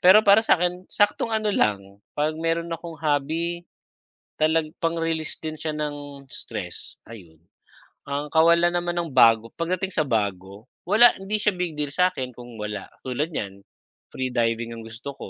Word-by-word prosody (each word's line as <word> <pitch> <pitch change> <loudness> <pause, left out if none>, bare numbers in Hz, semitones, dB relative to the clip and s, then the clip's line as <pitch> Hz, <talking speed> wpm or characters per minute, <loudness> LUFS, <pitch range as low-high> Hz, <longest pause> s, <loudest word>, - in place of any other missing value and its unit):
Pero 190 +4 +7
para 200 +2 +7
sa'kin 180 -3 +1
saktong 205 +2 +1
ano 215 -1 +1
lang, 100 - 0 0.2
'pag 155 +1 0
meron 165 +1 -1
akong 165 0 -6
hobby, 160 +3 -1 0.8
talag 155 0 +2
pang 165 0 0
release 165 -1 -2
din 155 -1 -4
siya 155 +1 -4
ng 145 -2 -5
stress 130 - -8
ayun. 90 -9 -13 0.7
Ang 145 +1 -2
kawalan 170 +2 +5
naman 175 0 -1
ng 170 -2 -1
bago 115 -2 +5
pagdating 185 +3 -1
sa 160 - +2
bago, 100 -1 -2 0.2
wala, 220 +7 +6
hindi 195 +3 -2
siya 210 -1 +2
big 180 -2 -3
deal 150 -1 -1
sa'kin 180 -8 +1
kung 120 -1 -11
wala, 105 -2 -4 0.2
tulad 135 +5 -1
niyan 100 -6 -5 0.5
free 130 0 -2
diving 115 -1 0
ang 115 -1 -8
gusto 115 +5 -7
ko, - - -8
155 Hz, 160 wpm, -24 LUFS, 115-175 Hz, 0.8 s, Pero